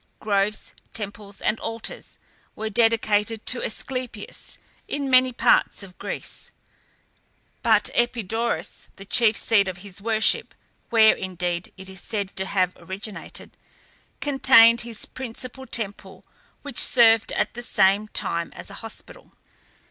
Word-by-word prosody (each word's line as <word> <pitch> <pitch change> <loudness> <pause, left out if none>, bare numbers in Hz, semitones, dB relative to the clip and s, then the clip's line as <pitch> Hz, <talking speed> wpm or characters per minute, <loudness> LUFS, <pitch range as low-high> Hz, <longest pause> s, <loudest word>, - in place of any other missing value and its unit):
Groves, 205 0 -1 0.2
temples, 205 -1 -6
and 215 - 0
altars 225 0 -7 0.4
were 220 0 -4
dedicated 225 -1 +2
to 255 - +2
Asclepias 250 -2 -5 0.3
in 280 -2 -3
many 255 0 +6
parts 240 - +2
of 180 -2 -14
Greece, - - -5 1.1
but - - +3
Epidaurus, 235 -1 -1
the 195 - -11
chief 225 +1 +3
seat 205 -4 +3
of 185 -1 -4
his 195 0 -9
worship, 220 0 +1 0.3
where, 220 -2 +6
indeed, 180 -2 -3
it 190 0 -10
is 190 0 -7
said 200 -3 -3
to 190 0 -1
have 185 -2 +1
originated, 195 +2 -8 0.7
contained 250 -5 +6
his 235 -2 -2
principal 260 +1 -8
temple, 215 -4 -5 0.4
which 285 -4 -1
served 225 -3 +5
at - - 0
the 240 - -6
same 200 -2 +3
time 170 -5 -2
as - - -9
a 200 - -9
hospital. 225 -1 -10
220 Hz, 125 wpm, -24 LUFS, 200-235 Hz, 1.1 s, many